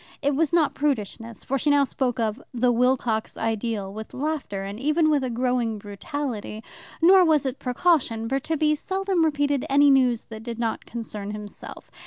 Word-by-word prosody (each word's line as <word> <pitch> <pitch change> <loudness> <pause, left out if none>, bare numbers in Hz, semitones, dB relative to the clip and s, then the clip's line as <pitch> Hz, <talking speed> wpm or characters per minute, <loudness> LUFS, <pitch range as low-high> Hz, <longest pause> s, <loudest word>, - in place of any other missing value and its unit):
It 285 +1 +2
was 320 +2 +1
not 335 -4 +3
prudishness, 230 -5 -3
for 275 +1 -1
she 295 - +1
now 285 -1 +5
spoke 255 -3 -1
of 225 +3 -1
"the 250 -1 +2
Wilcox 240 -2 +1
ideal" 220 -3 -2
with 220 +1 -8
laughter, 275 -9 -3
and 200 +2 -6
even 305 +3 +2
with 290 -3 +2
a 255 - -1
growing 240 -2 0
brutality. 215 +2 -5 0.4
Nor 370 +2 +8
was 310 -5 +3
it 265 0 -3
precaution, 250 -4 +1
for 270 +3 0
Tibby 310 +1 +1
seldom 380 +2 0
repeated 285 -3 +1
any 285 +1 +5
news 250 -4 +3
that 220 0 -7
did 230 0 -6
not 230 -1 -3
concern 215 -3 -5
himself. 210 -1 -9
255 Hz, 175 wpm, -24 LUFS, 225-290 Hz, 0.4 s, Nor